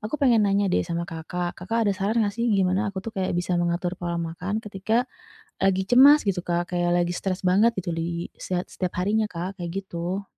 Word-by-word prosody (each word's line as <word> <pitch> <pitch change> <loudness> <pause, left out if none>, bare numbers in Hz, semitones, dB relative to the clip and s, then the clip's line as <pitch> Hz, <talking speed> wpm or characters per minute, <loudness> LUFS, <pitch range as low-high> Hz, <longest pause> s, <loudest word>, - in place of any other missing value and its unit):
aku 220 +8 -3
pengen 245 -6 +4
nanya 200 +1 +2
deh, - - +3
sama 170 0 -3
Kakak. 175 +1 -4
Kakak 225 +5 0
ada 205 - +2
saran 210 +4 0
nggak 205 - -1
sih, 235 +2 -1
gimana 195 0 +2
aku 190 -1 -6
tuh 225 - -5
kayak 185 -2 -1
bisa 175 +1 -1
mengatur 175 +1 -1
pola 175 -1 -2
makan, 180 +6 -3
ketika 210 +4 0 0.6
lagi 190 0 +2
cemas, 280 +6 +7
gitu 180 -2 +1
Kak. 175 +1 -2
Kayak 175 0 +1
lagi 175 - -2
stres 190 -1 -3
banget, 200 +6 +4
gitu 175 - -2
li 170 +1 -3
siat 180 -1 -2
setiap 185 -2 -3
harinya 215 +2 +1
Kak, 180 +2 -5
kayak 170 -1 -4
gitu. 180 +2 -4
190 Hz, 210 wpm, -25 LUFS, 175-210 Hz, 0.6 s, cemas